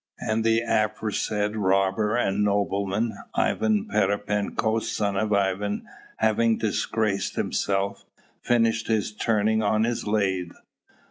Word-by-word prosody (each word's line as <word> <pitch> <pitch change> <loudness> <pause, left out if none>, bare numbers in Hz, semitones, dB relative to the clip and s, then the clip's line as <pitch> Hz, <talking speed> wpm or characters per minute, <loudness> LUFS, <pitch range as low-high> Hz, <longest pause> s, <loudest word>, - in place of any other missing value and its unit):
And 110 +1 -1
the 115 0 +3
aforesaid 105 -1 0
robber 95 +2 +1
and 105 -3 +1
nobleman, 100 +2 0 0.2
Ivan 110 -2 +1
Pererepenko, 105 +2 0
son 105 -3 -1
of 105 +2 0
Ivan, 100 +1 0 0.3
having 110 +1 +2
disgraced 110 -2 -1
himself, 100 0 -1 0.4
finished 115 -2 +1
his 110 -2 0
turning 110 0 +1
on 110 +1 +2
his 115 -1 -2
lathe. 95 -4 0
105 Hz, 110 wpm, -25 LUFS, 100-110 Hz, 0.4 s, the